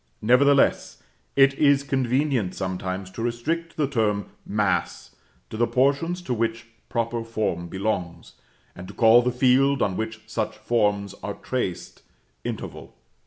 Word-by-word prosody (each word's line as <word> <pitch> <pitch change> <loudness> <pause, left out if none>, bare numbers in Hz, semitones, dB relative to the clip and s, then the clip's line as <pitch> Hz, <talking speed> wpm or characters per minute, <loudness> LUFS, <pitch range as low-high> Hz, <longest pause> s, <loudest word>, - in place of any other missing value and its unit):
Nevertheless, 140 +5 +3 0.3
it 135 0 +6
is 140 -2 +4
convenient 130 -6 0
sometimes 95 0 -4
to 115 - -7
restrict 150 +9 -2
the 150 -3 +1
term 105 -6 -1 0.2
"mass" 100 -4 -1 0.4
to 110 - -5
the 120 +1 +2
portions 145 +7 +1
to 130 - -2
which 115 0 -2 0.2
proper 115 0 -1
form 110 -7 -2
belongs, 90 -3 -3 0.4
and 90 +1 -9
to - - -11
call 115 0 +6
the 125 +1 0
field 130 +2 +3
on 95 -2 0
which 110 +1 -4
such 110 -1 -3
forms 105 -3 0
are 100 - -4
traced, 120 -9 -4 0.4
interval. - - -6
115 Hz, 135 wpm, -24 LUFS, 100-135 Hz, 0.4 s, it